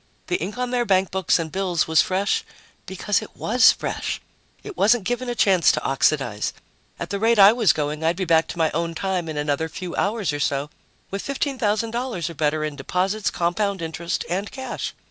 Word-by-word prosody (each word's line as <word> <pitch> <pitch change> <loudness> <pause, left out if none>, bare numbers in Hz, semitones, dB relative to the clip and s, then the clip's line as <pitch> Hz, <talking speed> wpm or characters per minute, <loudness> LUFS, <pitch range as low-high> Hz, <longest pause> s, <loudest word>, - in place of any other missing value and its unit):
The 360 - +1
ink 215 - -5
on 250 0 -2
their 245 -1 +1
bankbooks 190 -3 +2
and 165 -2 -4
bills 185 -4 0
was 160 -1 +5
fresh 195 +2 0 0.4
because 190 +2 0
it - - -11
was 245 +3 +5
fresh; - - -3 0.4
it 415 -2 -8
wasn't 220 - +3
given 245 +4 -2
a 240 - -2
chance 190 -6 +4
to - - -2
oxidize 135 -6 0 0.5
at - - -5
the 200 - -2
rate 225 +2 +3
I 200 +1 +8
was 230 -5 +4
going, 150 +1 -3
I'd 165 +2 +2
be 185 +1 -2
back 165 -1 +3
to - - -7
my 160 -2 +2
own 165 +1 -2
time 185 -2 -2
in 155 - -5
another 150 +2 -1
few 180 +2 -6
hours 200 -6 0
or 145 - -3
so, 140 +1 -1 0.4
with 195 0 -3
$15,000 235 - -1
or - - -8
better 155 0 0
in 155 -1 -3
deposits, 190 +9 -1
compound 195 +3 -1
interest 165 +1 -3
and 195 +4 -2
cash. 265 -1 -5
185 Hz, 195 wpm, -23 LUFS, 160-215 Hz, 0.5 s, I